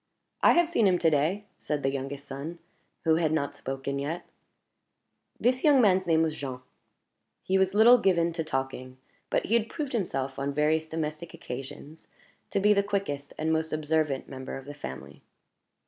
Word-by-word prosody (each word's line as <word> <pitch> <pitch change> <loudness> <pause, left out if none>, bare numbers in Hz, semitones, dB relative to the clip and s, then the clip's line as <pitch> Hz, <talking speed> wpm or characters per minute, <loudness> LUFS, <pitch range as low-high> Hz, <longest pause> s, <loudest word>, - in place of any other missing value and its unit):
"I - - +7
have 345 -1 +4
seen 230 -11 +3
him 180 -2 +3
to 165 -2 +3
day," 160 +8 +1
said 150 -1 -3
the 135 - +1
youngest 140 +1 -5
son, 140 +5 -6 0.5
who 160 -1 +3
had 160 -2 +1
not 145 -3 -1
spoken 135 +1 -4
yet. 155 +5 -4 1.1
This 255 +2 +1
young 290 -3 +6
man's 190 -5 +4
name 160 -1 +4
was 160 -1 0
Jean; 130 -3 -6 0.8
he 190 +1 +2
was 190 +1 +1
little 235 +3 +7
given 170 -5 +2
to 165 -1 -2
talking, 135 -3 -4 0.3
but - - 0
he 220 - -1
had 230 -1 +2
proved 295 -5 -4
himself, 135 - -2
on 140 0 -2
various 155 +2 +1
domestic 160 +1 -4
occasions, 135 +4 -9 0.4
to - - 0
be 210 +2 +5
the 200 - +3
quickest 195 -9 -3
and 160 +1 0
most 160 0 -1
observant 155 -2 0
member 130 0 -6
of 135 - -10
the 145 - -7
family. 65 - -9
160 Hz, 180 wpm, -28 LUFS, 140-190 Hz, 1.1 s, I